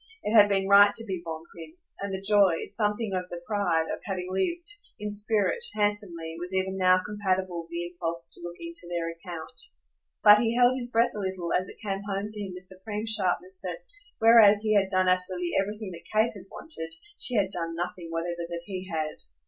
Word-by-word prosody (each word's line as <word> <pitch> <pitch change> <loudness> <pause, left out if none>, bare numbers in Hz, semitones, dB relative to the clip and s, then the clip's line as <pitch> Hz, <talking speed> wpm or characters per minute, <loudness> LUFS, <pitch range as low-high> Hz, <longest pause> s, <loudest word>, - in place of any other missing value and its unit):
It 215 - 0
had 205 -2 +8
been 195 -1 +1
right 205 +1 +7
to 225 - -2
be 190 -5 -4
bon 160 -1 -6
prince, 165 +1 -9
and 200 0 -4
the 190 - -3
joy, 200 -5 +4
something 210 -1 -1
of 180 -1 -2
the 175 - -6
pride, 195 -6 +1
of - - -5
having 185 -2 -3
lived, 340 - -1 0.3
in 210 0 -4
spirit, 210 - +1
handsomely, 200 -6 -1
was 180 +2 -5
even 190 0 0
now 185 -1 +4
compatible 190 -4 -1
with 165 - -16
the 170 0 -3
impulse 170 -1 -5
to - - -7
look 175 0 -7
into 335 - -4
their 170 -1 -2
account; 170 +5 -7 0.6
but 210 0 +9
he 230 0 +1
held 245 +1 +5
his 245 -2 -2
breath 235 0 +2
a 210 - -5
little 190 -3 -3
as 185 +1 0
it - - -12
came 195 -1 -2
home 195 +1 -1
to 210 -1 -3
him 195 -2 -5
with 180 - -9
supreme 200 +4 -6
sharpness 225 - 0
that, - - -5 0.4
whereas 220 -2 +7
he 215 -1 +2
had 195 -2 +3
done 185 -1 +3
absolutely 180 -1 +2
everything 210 0 -5
that 170 -1 -12
Kate 220 +2 +2
had 195 -2 -12
wanted, 165 - -7 0.2
she 250 -4 +3
had 195 -3 +2
done 165 -2 -3
nothing 175 0 -4
whatever 170 +1 -3
that 170 0 -5
he 185 -1 -6
had. 155 -2 -3
190 Hz, 210 wpm, -27 LUFS, 175-210 Hz, 0.6 s, but